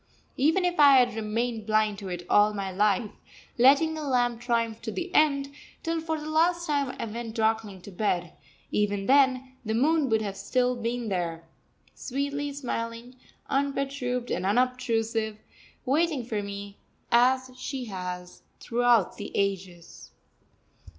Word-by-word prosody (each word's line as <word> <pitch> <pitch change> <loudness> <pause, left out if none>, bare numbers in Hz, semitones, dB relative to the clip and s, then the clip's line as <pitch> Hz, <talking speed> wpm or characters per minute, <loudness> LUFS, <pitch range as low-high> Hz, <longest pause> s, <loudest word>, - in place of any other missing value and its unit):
Even 320 +7 +2
if 355 -2 -1
I 285 -1 +8
had 245 -2 +4
remained 225 +1 -2
blind 215 -2 +2
to 195 - -7
it 175 -1 -5
all 210 +1 +4
my 195 -1 -3
life, 205 +2 +1 0.5
letting 280 +6 +5
the 315 - -5
lamp 245 -4 0
triumph 230 -2 -1
to 220 - -4
the 360 +7 -5
end, 280 -2 +3 0.3
till 330 -1 -1
for 320 -1 -2
the 300 - -7
last 340 +2 +2
time 285 -4 -1
I - - -2
went 230 0 -6
darkling 220 -4 0
to 200 - -10
bed, 175 -3 -1 0.4
even 205 -1 0
then 260 -1 +3
the 220 -1 -2
moon 295 +3 +2
would 220 -1 +2
have 200 -2 -4
still 250 +5 0
been 235 -1 -3
there, 170 -3 -2 0.5
sweetly 285 +2 -3
smiling, 240 -3 -5 0.3
unperturbed 275 -3 -1
and - - -1
unobtrusive, 225 -1 0 0.5
waiting 290 -1 +1
for 215 -3 -2
me 200 0 -7 0.3
as 255 +2 +3
she 255 0 -5
has 180 -3 -6 0.2
throughout 240 -4 +2
the 205 - -7
ages. 185 -3 -3
240 Hz, 145 wpm, -27 LUFS, 210-275 Hz, 0.5 s, I